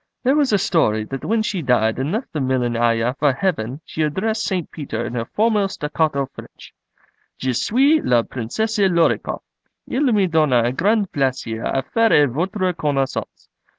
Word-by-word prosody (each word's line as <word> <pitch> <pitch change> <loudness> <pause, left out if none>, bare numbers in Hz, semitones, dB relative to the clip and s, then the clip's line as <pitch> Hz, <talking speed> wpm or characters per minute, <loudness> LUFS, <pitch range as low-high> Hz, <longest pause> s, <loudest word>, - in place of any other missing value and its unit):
There 265 +2 +3
was 290 -4 +2
a 205 - +4
story 110 - +1
that 135 +4 -7
when 220 0 +1
she 195 -4 -2
died 120 -4 +1
and 135 +4 -1
left 225 +6 -4
the 155 - -2
Millionaya 120 -2 +1
for 145 -2 +3
Heaven 140 - -2
she 160 - -5
addressed 200 +9 -1
St. 185 -4 -2
Peter 120 -7 -4
in - - -5
her 115 -2 -2
formal 210 - +1
staccato 150 -4 -1
French: - - -13 0.6
'Je 130 -1 -1
suis 265 - +3
la 120 -2 +3
Princesse 210 - -3
Lor 175 -4 +4
i - - -7
koff. - - -6 0.4
Il 270 0 +1
me 205 -3 +3
donne 135 -8 +2
grand 205 - +2
plaisir 130 -5 -2
à 135 - -1
faire 225 -11 +3
votre 185 - -1
connaissance. 140 -4 -3
155 Hz, 170 wpm, -20 LUFS, 125-205 Hz, 0.6 s, a